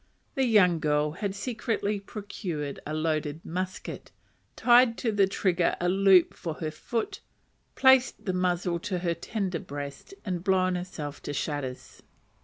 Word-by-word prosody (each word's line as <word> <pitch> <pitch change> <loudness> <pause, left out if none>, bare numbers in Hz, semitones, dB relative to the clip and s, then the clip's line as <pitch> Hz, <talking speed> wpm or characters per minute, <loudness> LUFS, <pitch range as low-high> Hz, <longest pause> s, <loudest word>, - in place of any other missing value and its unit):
The 270 - +1
young 190 -8 +4
girl 150 0 +1
had 195 +4 -4
secretly 215 -2 -2
procured 190 -8 -5
a 155 - -3
loaded 155 -1 -2
musket, 185 +2 -5 0.5
tied 240 -1 +5
to 230 - 0
the 200 -2 +3
trigger 180 -3 +1
a 175 - +1
loop 190 -2 +5
for 165 -3 -5
her 155 -1 -4
foot, 225 +8 -3 0.6
placed 265 -1 +4
the 185 - 0
muzzle 180 -1 0
to 185 +2 -3
her 170 - +2
tender 185 0 -3
breast, 145 - -7
and 180 -3 -3
blown 185 -1 +2
herself 175 -5 -5
to 145 - -5
shatters. 145 -3 -4
180 Hz, 145 wpm, -28 LUFS, 155-205 Hz, 0.6 s, tied